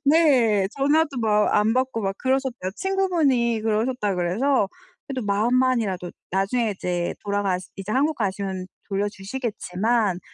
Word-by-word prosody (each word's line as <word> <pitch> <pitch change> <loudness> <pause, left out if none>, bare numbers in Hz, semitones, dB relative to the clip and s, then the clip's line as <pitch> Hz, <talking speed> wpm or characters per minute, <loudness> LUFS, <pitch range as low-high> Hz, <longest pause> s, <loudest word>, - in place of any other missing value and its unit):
네. 260 - +4
전화도 290 +1 +2
막 210 -1 +2
안 210 +2 +3
받고 255 -2 0
막 195 0 -1
그러셨대요. 260 -7 -1
친구분이 320 - +1
그러셨다 220 -1 0
그래서 200 +7 +1 0.4
그래도 260 -2 -3
마음만이라도 220 -4 +1 0.2
나중에 205 +5 +1
이제 175 -2 -2
돌아가시 200 -3 -1
이제 195 +2 -6
한국 290 +4 +2
가시면 195 -3 -2 0.2
돌려주시겠지만 205 0 -1
220 Hz, 330 characters per minute, -24 LUFS, 195-260 Hz, 0.4 s, 네